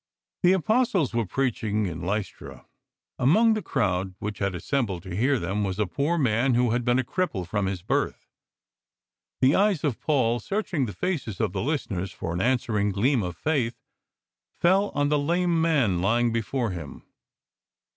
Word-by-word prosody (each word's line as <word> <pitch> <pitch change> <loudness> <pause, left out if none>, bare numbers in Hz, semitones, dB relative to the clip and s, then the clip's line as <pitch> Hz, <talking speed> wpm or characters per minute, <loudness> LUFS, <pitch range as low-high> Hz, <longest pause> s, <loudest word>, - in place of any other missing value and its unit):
The 180 0 +5
Apostles 190 - +1
were 115 -3 0
preaching 110 -4 -1
in 85 -3 -5
Lystra. 105 +3 -4 0.5
Amongst 215 - +4
the 215 - -1
crowd 95 - -1
which 105 0 -5
had 100 -2 -1
assembled 100 - -2
to 95 -2 -6
hear 130 +7 +2
them 100 +1 -2
was 95 -1 -2
a 105 - +1
poor 145 - -1
man 125 -2 +2
who 120 -1 +2
had 120 +1 0
been 120 +1 +2
a 130 - +1
cripple 125 - -2
from 100 0 -1
his 95 -2 -4
birth. - - -1 1.2
The 130 +2 +5
eyes 200 -5 +2
of 140 -7 -1
Paul, 120 -6 +1
searching 175 - -2
the 105 - -6
faces 125 - -3
of 110 -5 0
the 95 - -2
listeners 100 - -2
for 85 - -5
an 85 - -1
answering 115 -4 +1
gleam 120 +6 +2
of 90 -3 -5
faith, 130 - -1 0.8
fell 195 +4 +3
on 145 0 +1
the 150 0 +2
lame 170 +2 +1
man 130 - +2
lying 115 +4 +2
before 115 0 -1
him. 80 -6 -8
120 Hz, 170 wpm, -26 LUFS, 100-150 Hz, 1.2 s, The